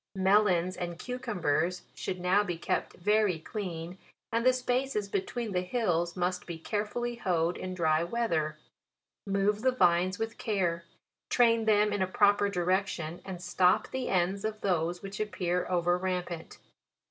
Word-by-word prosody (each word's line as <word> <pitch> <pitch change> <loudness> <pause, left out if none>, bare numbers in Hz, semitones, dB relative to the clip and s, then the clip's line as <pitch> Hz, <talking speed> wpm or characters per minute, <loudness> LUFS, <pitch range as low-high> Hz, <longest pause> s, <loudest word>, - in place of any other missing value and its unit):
MELONS 190 -2 +3
and 175 -1 -4
CUCUMBERS 180 - -1
should 185 - -4
now 185 +3 +3
be 175 -4 -3
kept - - -2
very 210 -1 +2
clean, 175 -1 -6 0.3
and 230 0 +1
the 255 - +6
spa 255 0 0
ces 210 -6 -2
between 205 +3 -3
the 180 -1 +1
hills 180 -5 0
must 180 +1 -1
be 170 -2 -5
carefully 215 +7 -3
hoed 175 -5 0
in 185 0 -5
dry 160 -2 +2
weather; 170 -7 -1 0.7
move 200 +2 +1
the 260 - +4
vines 185 -4 +3
with 225 0 -4
care, 175 -6 -1 0.4
train 230 -2 +4
them 210 -1 +3
in 205 - -1
a 185 - +2
proper 205 +1 +3
direction, 180 -3 -1
and 180 -2 -7
stop 180 +3 +2
the 260 -1 -2
ends 190 +2 +1
of 215 0 -3
those 175 -1 0
which 195 0 -7
appear 180 -4 -1
over 175 0 +2
rampant. 180 -3 -3
185 Hz, 155 wpm, -30 LUFS, 175-210 Hz, 0.7 s, the